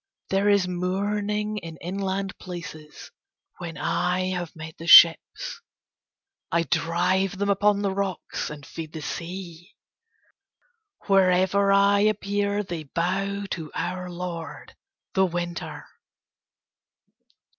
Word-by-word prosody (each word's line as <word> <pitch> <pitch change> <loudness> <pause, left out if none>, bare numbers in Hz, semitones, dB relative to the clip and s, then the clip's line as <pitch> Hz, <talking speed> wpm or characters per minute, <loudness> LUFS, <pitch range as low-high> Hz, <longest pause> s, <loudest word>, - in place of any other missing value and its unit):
There 195 +2 +3
is 200 -3 +3
mourning 205 +4 -1
in 165 -3 -9
inland 195 +2 -3
places 165 -4 -9 0.5
when 170 -2 -6
I 185 +1 0
have 175 -3 -4
met 160 0 -9
the 165 - -7
ships. 175 - +7 0.9
I 170 0 +2
drive 175 +4 +1
them 200 +1 +1
upon 205 +1 +2
the 195 -1 0
rocks 195 -2 -3
and 145 -1 -9
feed 160 +1 -8
the 160 -2 -6
sea. 175 +2 -7 1.3
Wherever 190 +1 +3
I 200 0 +5
appear 205 0 +1
they 175 -4 -5
bow 195 +6 -1
to 160 -4 -4
our 180 +1 -3
lord 175 -2 -7 0.4
the 190 0 +3
Winter." 175 0 -5
185 Hz, 110 wpm, -25 LUFS, 170-200 Hz, 1.3 s, ships